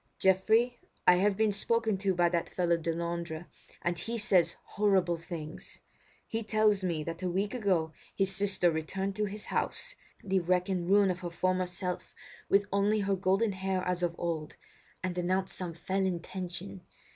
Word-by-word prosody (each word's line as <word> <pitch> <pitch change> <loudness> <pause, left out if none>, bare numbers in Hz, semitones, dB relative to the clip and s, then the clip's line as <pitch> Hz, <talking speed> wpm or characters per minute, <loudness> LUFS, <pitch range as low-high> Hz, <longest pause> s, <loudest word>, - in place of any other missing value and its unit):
"Geoffrey, 220 +6 +3 0.3
I 180 - +7
have 195 +1 +2
been 220 -1 +3
spoken 225 +1 +1
to 195 -1 +1
by 175 0 +4
that 170 -1 -1
fellow 175 -2 +2
Delandre, 170 0 -3 0.4
and 175 -1 0
he 235 +1 -3
says 180 -6 +3
horrible 190 -4 +2
things. 165 -2 -7 0.5
He 225 - -2
tells 215 -1 +3
to 185 - -1
me 160 -3 -1
that 165 +2 -5
a 185 - -1
week 195 +5 -1
ago 185 -9 +1 0.2
his 195 -1 +3
sister 190 -3 +3
returned 190 +5 -2
to 210 - +1
his 210 +1 -5
house, - - -1 0.3
the 190 -1 +2
wreck 180 +1 +1
and 180 -2 -1
ruin 200 -1 +5
of 180 - -4
her 175 -1 -4
former 185 +1 0
self, 180 0 -4 0.3
with 200 +1 +4
only 205 +2 +3
her 200 0 +1
golden 195 +3 +2
hair 190 -1 -1
as 180 -1 0
of 170 -1 0
old, 160 -3 -3 0.5
and 180 -1 -2
announced 185 +2 0
some 175 -3 -5
fell 190 +3 -1
intention. 185 +1 -4
185 Hz, 175 wpm, -31 LUFS, 175-200 Hz, 0.5 s, I